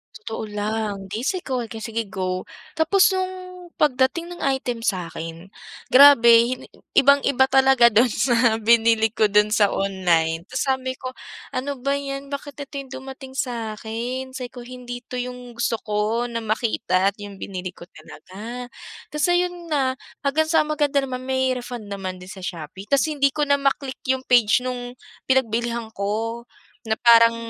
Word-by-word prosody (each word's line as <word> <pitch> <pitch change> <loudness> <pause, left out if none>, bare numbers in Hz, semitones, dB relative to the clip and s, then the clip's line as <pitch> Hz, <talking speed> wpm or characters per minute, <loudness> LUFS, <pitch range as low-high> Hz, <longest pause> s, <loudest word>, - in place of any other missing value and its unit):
Totoo 225 - -6
lang, 210 -1 -3
'di 215 - -3
si 370 +7 0
go, 260 -2 -2
sige 225 -1 -4
go. 185 -2 -3 0.3
Tapos 375 +5 +4
nung 375 0 -2 0.4
pagdating 295 +5 +1
ng 345 - -11
item 245 -3 -4
sa'kin, 170 -3 -4 0.4
grabe, 240 -3 +7 0.4
ibang-iba 280 -1 +5
talaga 265 -3 +6
dun 230 +4 +5
sa 235 -1 +2
binili 225 0 +3
ko 215 - +3
dun 210 +1 +3
sa 205 -2 +4
online. 175 -3 0
Tapos 255 - -2
sabi 260 -1 -1
ko, 255 -1 -6 0.4
"Ano 280 +2 -2
ba 275 0 +1
'yan, 275 0 -6
bakit 280 0 -6
ito 280 0 -7
yung 275 -1 -9
dumating 265 0 -10
sa 235 -5 -3
akin." 245 +4 -5
Sabi 255 -2 -5
ko, 245 0 -10
"Hindi 245 0 -8
ito 250 - -5
yung 250 0 -6
gusto 235 0 0
ko 215 +2 0
na 235 -1 -3
makita 210 -4 +1
at 200 - -31
yung 205 -1 -8
binili 185 -2 -5
ko - - -12
talaga." 215 +9 -10 0.4
Tapos 300 0 +1
ayun 350 -1 0
na, 270 -4 +1 0.3
hanggang 310 +3 +2
sa 325 - +4
maganda 295 -2 0
naman, 255 -1 -4
may 260 0 +1
refund 245 -2 -6
naman 190 -2 -4
din 185 +2 -11
sa 195 - -10
Shopee. 180 +1 -7
Tapos 280 +1 +3
hindi 280 -2 +2
ko 300 - +1
na 285 0 +2
ma-click 275 -1 -1 0.2
yung 260 - -8
page 240 0 +4
nung 245 -1 -5 0.3
pinagbilihan 235 -2 0
ko 220 +4 -2 0.5
na 220 - +1
parang 230 -1 +6
240 Hz, 160 wpm, -23 LUFS, 215-265 Hz, 0.5 s, grabe